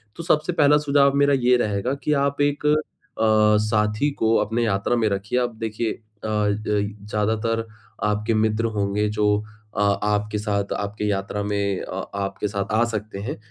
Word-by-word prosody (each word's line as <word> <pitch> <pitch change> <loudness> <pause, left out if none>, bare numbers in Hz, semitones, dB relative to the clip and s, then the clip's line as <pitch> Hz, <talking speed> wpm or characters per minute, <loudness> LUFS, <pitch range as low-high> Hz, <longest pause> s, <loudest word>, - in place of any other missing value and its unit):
तो 170 - -7
सबसे 160 0 +1
पहला 150 -2 +5
सुझाव 140 -1 +3
मेरा 140 0 +4
ये 125 -2 +4
रहेगा 105 +2 -1
कि 150 - +2
आप 140 +1 -3
एक 145 +1 0
अ, 150 - +5 0.9
साथी 105 +5 +1
को 115 0 +3
अपने 115 +2 0
यात्रा 100 +3 +1
में 115 -2 +2
रखिए 100 +5 -1
अब 120 -2 -2
देखिए 110 0 -2
अ, - - -7 0.3
ज 105 0 0 0.3
ज़्यादातर 110 +2 0 0.4
आपके 105 +1 0
मित्र 110 +1 +1
होंगे 100 +1 0
जो 105 0 +1 0.5
अ, - - 0 0.2
आपके 105 0 0
साथ 100 -1 -2
आपके 105 +1 -3
यात्रा 100 0 -2
में 100 -2 -1
अ, 95 +1 -5
आपके 100 +1 -2
साथ 100 -1 -2
आ 110 +2 +4
सकते 110 -3 -5
हैं। 105 - -4
105 Hz, 170 wpm, -23 LUFS, 105-120 Hz, 0.9 s, पहला